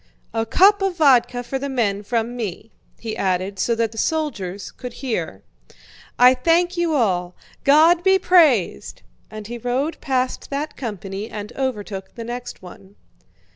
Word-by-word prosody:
"A 225 0 -1
cup 400 - +5
of 385 -2 -1
vodka 250 -5 +3
for 265 +2 -4
the 280 +1 -4
men 215 -6 0
from 230 +2 -2
me," 220 -1 -6 0.3
he 225 -2 -5
added 190 +1 -1
so 235 - +1
that 225 -1 0
the 225 - -7
soldiers 205 - -2
could 250 -2 -9
hear. 175 - -4 0.7
"I 250 +1 +7
thank 340 +7 +2
you 340 -3 0
all! 180 -8 0 0.3
God 320 +5 +5
be 380 0 +5
praised!" 305 - +2 0.3
and 215 -1 -8
he 240 +2 -7
rode 255 +7 -2
past 255 -2 -2
that 290 +2 -4
company 205 -3 -6
and 210 +2 -7
overtook 205 -7 -4
the 230 - -6
next 240 -3 -7
one. 190 +2 -13
240 Hz, 155 wpm, -21 LUFS, 205-280 Hz, 0.7 s, I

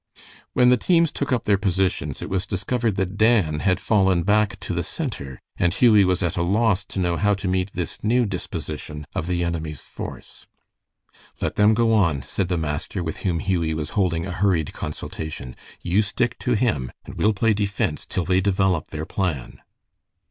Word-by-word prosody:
When 125 0 +5
the 125 - +5
teams 170 -3 +3
took 140 - -3
up 125 -3 +1
their 100 -2 +2
positions, 95 -1 0
it - - -5
was 95 0 -1
discovered 110 +2 -1
that 95 +1 -2
Dan 105 -9 +3
had 95 +2 +2
fallen 95 -5 +2
back 105 +2 +2
to - - -4
the - - 0
center, 65 -2 -5 0.2
and 85 - +2
Hughie 110 -5 +6
was 90 +1 +1
at 85 - 0
a - - +1
loss 100 +2 +2
to - - -6
know 90 -2 +1
how 105 0 +2
to 95 0 -4
meet 95 +2 0
this 90 -3 -4
new 120 +3 +3
disposition 75 -6 -5
of 80 - -3
the 90 -1 0
enemy's 80 -4 -3
force. - - -9 0.9
"Let - - -2
them 105 +1 +5
go 115 0 +3
on," 85 -11 +2
said 95 - -2
the 90 -1 0
master, 80 +4 -3
with 80 -1 -4
whom 90 -4 -1
Hughie 85 -5 0
was 75 0 -4
holding 90 -6 0
a 95 - -4
hurried 90 -5 +1
consultation. 75 -4 -6 0.3
"You 90 +4 +3
stick 120 +3 -1
to 125 - 0
him, 100 - 0
and - - -9
we'll 110 - +2
play 110 +2 +2
defense 100 -1 -1
till 90 - -2
they 95 0 +3
develop 95 -4 +1
their 80 0 -5
plan." 85 -11 -3
95 Hz, 190 wpm, -23 LUFS, 85-105 Hz, 0.9 s, Hughie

